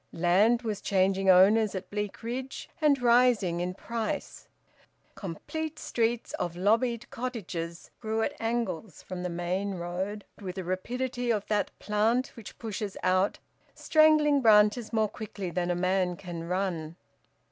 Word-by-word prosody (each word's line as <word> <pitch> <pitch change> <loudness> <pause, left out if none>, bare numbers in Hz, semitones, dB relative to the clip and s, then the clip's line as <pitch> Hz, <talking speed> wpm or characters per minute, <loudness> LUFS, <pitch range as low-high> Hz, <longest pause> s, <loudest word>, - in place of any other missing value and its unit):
Land 200 +8 +3
was 215 -3 -3
changing 195 0 +2
owners 200 +3 +6
at 185 -1 -6
Bleakridge, 230 +5 -4
and 290 -3 +4
rising 235 -7 +3
in 180 +1 -2
price. 225 +1 -4 0.7
Complete 305 - -5
streets 235 -4 -1
of 175 -1 -2
lobbied 230 +5 +1
cottages 180 -9 -5
grew 220 0 -1
at - - -1
angles 225 -6 -3
from 185 -1 -6
the 180 - -2
main 180 +3 -2
road 185 +4 -4
with 185 -3 -6
the 190 - -4
rapidity 245 +7 -3
of 210 -3 +1
that 210 -1 +1
plant 220 +5 +1
which 230 -5 -11
pushes 210 -3 -5
out 185 +2 +2 0.4
strangling 305 -2 +4
branches 215 0 +5
more 220 -2 +2
quickly 200 -4 -6
than 175 0 -1
a 175 - +1
man 185 0 +1
can 170 -2 -7
run. 170 -3 -2
205 Hz, 135 wpm, -28 LUFS, 185-235 Hz, 0.7 s, owners